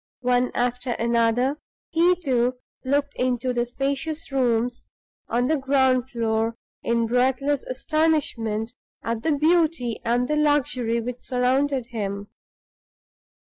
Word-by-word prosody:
One 250 0 +2
after 245 +1 0
another, 235 +4 +1 0.3
he, 345 +2 +4
too, 255 -7 0 0.3
looked 285 +2 0
into 250 0 0
the 240 0 0
spacious 280 +5 -3
rooms 245 -2 0 0.4
on 240 +2 +1
the 310 +4 +2
ground 265 -2 +2
floor 225 -1 0 0.3
in 235 0 +1
breathless 260 +4 +1
astonishment 255 -6 0 0.3
at 230 -1 -2
the 320 - +1
beauty 315 -6 +2
and 240 +2 +1
the 300 - 0
luxury 260 -6 +1
which 245 +1 -5
surrounded 260 +1 +1
him. 200 -2 -4
250 Hz, 115 wpm, -24 LUFS, 235-280 Hz, 0.4 s, he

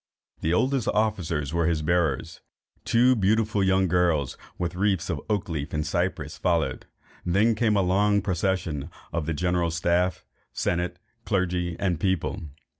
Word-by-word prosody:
The 80 - -1
oldest 130 +6 +1
officers 85 -9 0
were 85 -1 +1
his 80 -2 0
bearers; 80 -4 0 0.4
two 125 +2 +4
beautiful 105 0 +2
young 95 0 +3
girls 85 -6 +1 0.2
with 85 -1 -2
wreathes 95 -1 0
of - - -3
oak 105 -2 0
leaves 80 -2 -4
and 75 0 -1
cypress 85 -2 -2
followed, 80 -8 0 0.4
and 90 0 -1
then 110 +3 +4
came 110 -1 +2
a 100 - +3
long 100 +2 +2
procession 90 -5 -1 0.2
of 85 -3 -2
the 80 - 0
general 90 +1 +1
staff, 85 +2 0 0.3
senate, 90 0 -1 0.3
clergy, 90 -3 -1
and 90 -5 0
people. 95 -1 -1
90 Hz, 150 wpm, -26 LUFS, 80-100 Hz, 0.4 s, two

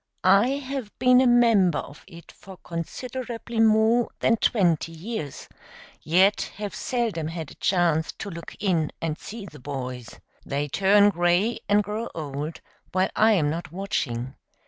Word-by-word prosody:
I 195 +5 +5
have 265 -5 -5
been 250 0 +5
a 260 - +4
member 225 -9 +4
of 140 - -8
it 170 -3 -13
for 190 -2 -13
considerably 235 +6 -5
more 225 +2 +4
than 230 - +3
twenty 175 -8 +1
years, 165 - -6 0.5
yet 185 +6 +3
have 205 -2 -5
seldom 225 - -2
had 160 -3 -6
a - - -17
chance 170 -4 +2
to 200 - -7
look 170 -1 -9
in 170 -6 0
and 160 -2 -3
see 215 -1 -8
the 155 -6 -12
boys. 125 -3 -6 0.3
They 145 +1 -2
turn 200 +4 +4
gray 175 +5 +1
and 205 +1 +4
grow 215 +3 -4
old 150 0 -5 0.3
while 185 +1 +1
I 220 +1 +5
am 150 -7 +2
not 165 -1 -5
watching. 135 -10 -3
190 Hz, 150 wpm, -25 LUFS, 160-220 Hz, 0.5 s, I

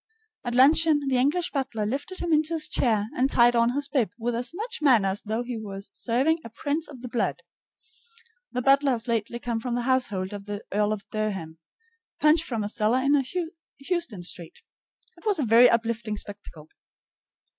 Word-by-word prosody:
At 240 -1 -3
luncheon 290 +2 +5
the 260 - +2
English 310 +7 +1
butler 260 -7 -2
lifted 280 - -4
him 340 -2 0
into 310 +2 +2
his 305 -1 +1
chair 220 -8 +1
and 260 +2 +2
tied 240 -1 +5
on 235 +1 +3
his 285 0 -1
bib 265 -6 +1
with 240 +1 -2
as 245 +2 -3
much 420 +2 -5
manner 235 -9 +4
as 195 +2 -1
though 220 +3 -3
he 240 -2 -5
were 200 -2 -7
serving 255 +10 0
a - - -8
prince 290 +8 -3
of 260 -4 -12
the - - -4
blood. 240 -1 -2 1.1
The 250 0 -2
butler 275 0 +4
has 230 0 -1
lately 230 0 -1
come 235 -1 -3
from 240 +1 -3
the 245 - -1
household 210 -7 0
of 200 -1 -7
the 205 0 -6
Earl 210 +1 +1
of 210 -2 -4
Durham, 195 -7 -3 0.6
Punch 310 +2 +4
from 230 -7 -3
a - - -2
cellar 215 +3 +1
in 275 +1 +3 0.5
Houston 275 - -2
Street. 170 -1 -6 0.5
It - - -19
was 410 -3 +3
a 290 - 0
very 235 +2 +7
uplifting 230 -2 -1
spectacle. 200 -7 -8
240 Hz, 190 wpm, -26 LUFS, 215-280 Hz, 1.1 s, very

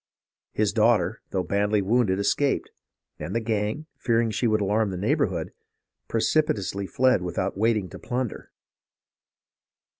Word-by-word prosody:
His - - 0
daughter, - - +2
though 95 - -1
badly 100 +3 +1
wounded, 100 -1 +2
escaped; 135 +7 0 0.5
and - - -5
the - - +3
gang, 110 +5 -2
fearing 115 -1 +1
she 115 +3 0
would 110 -1 +2
alarm 105 +1 +1
the 95 - -4
neigh 105 +10 +1
bourhood, 90 - -1 0.6
precipitately 110 -6 0
fled 130 -4 +3
without 90 +2 -2
waiting 105 -1 +1
to - - -10
plunder. 125 0 -4
110 Hz, 130 wpm, -25 LUFS, 95-120 Hz, 0.6 s, the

